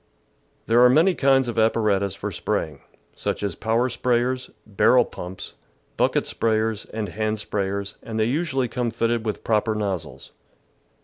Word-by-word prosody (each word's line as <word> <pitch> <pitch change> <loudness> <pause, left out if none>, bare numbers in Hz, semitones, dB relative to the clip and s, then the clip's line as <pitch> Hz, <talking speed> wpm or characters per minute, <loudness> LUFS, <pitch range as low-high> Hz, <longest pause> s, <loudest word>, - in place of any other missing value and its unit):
There 115 +2 +4
are 125 - +8
many 165 +9 +4
kinds 135 -4 +3
of 115 -1 -2
apparatus 105 -3 +2
for 100 +1 -5
spray 85 - -1
ing, 70 -2 -17 0.3
such - - -3
as 100 - -1
power 115 +3 0
sprayers, 125 +1 0 0.2
barrel 110 +4 +4
pumps, 90 +1 -8 0.4
bucket - - +2
sprayers, 110 -1 -1
and 110 -3 -3
hand 110 +3 -2
sprayers, 100 -1 -3
and 110 -1 -5
they 110 - +3
usually 135 0 0
come 120 +1 -2
fitted 115 0 -1
with 105 - -3
proper 110 0 +1
nozzles. 85 -10 -4
110 Hz, 150 wpm, -23 LUFS, 100-120 Hz, 0.4 s, are